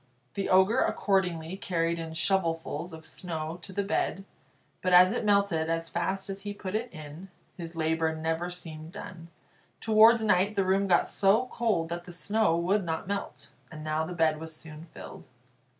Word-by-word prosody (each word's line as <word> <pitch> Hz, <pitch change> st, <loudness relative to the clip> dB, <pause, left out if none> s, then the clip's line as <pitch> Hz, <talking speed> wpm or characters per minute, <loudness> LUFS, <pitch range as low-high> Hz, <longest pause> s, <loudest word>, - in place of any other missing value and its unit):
The 195 Hz, -, -2 dB
Ogre 190 Hz, +6 st, +5 dB
accordingly 180 Hz, -7 st, 0 dB
carried 170 Hz, -5 st, -1 dB
in 165 Hz, -1 st, -6 dB
shovelfuls 165 Hz, -2 st, -1 dB
of 160 Hz, 0 st, -10 dB
snow 160 Hz, 0 st, -5 dB
to 190 Hz, -, -9 dB
the 200 Hz, +2 st, -1 dB
bed, 195 Hz, -1 st, -1 dB, 0.6 s
but 185 Hz, -1 st, +1 dB
as 180 Hz, +1 st, +8 dB
it 240 Hz, -, -2 dB
melted 200 Hz, -6 st, +2 dB
as 165 Hz, 0 st, -1 dB
fast 190 Hz, +3 st, -2 dB
as 195 Hz, 0 st, -6 dB
he 205 Hz, 0 st, -6 dB
put 190 Hz, -2 st, -6 dB
it 230 Hz, +3 st, -2 dB
in, 155 Hz, +4 st, -10 dB, 0.3 s
his 170 Hz, -2 st, -8 dB
labour 160 Hz, 0 st, 0 dB
never 165 Hz, +2 st, -2 dB
seemed 165 Hz, -2 st, -8 dB
done. 175 Hz, -4 st, -9 dB, 0.5 s
Towards 220 Hz, +1 st, +6 dB
night 205 Hz, 0 st, +2 dB
the 195 Hz, -, +1 dB
room 195 Hz, +1 st, +2 dB
got 180 Hz, -, +3 dB
so 205 Hz, +5 st, +3 dB
cold 210 Hz, -9 st, 0 dB
that 175 Hz, +1 st, -5 dB
the 180 Hz, -, -9 dB
snow 205 Hz, 0 st, +1 dB
would 190 Hz, +4 st, +1 dB
not 160 Hz, 0 st, -3 dB
melt, 200 Hz, 0 st, -5 dB, 0.2 s
and 155 Hz, -1 st, -8 dB
now 155 Hz, +1 st, -1 dB
the 170 Hz, +3 st, -5 dB
bed 160 Hz, -2 st, +2 dB
was 160 Hz, 0 st, -7 dB
soon 155 Hz, 0 st, -11 dB
filled. -, -, -11 dB
175 Hz, 180 wpm, -28 LUFS, 160-195 Hz, 0.6 s, as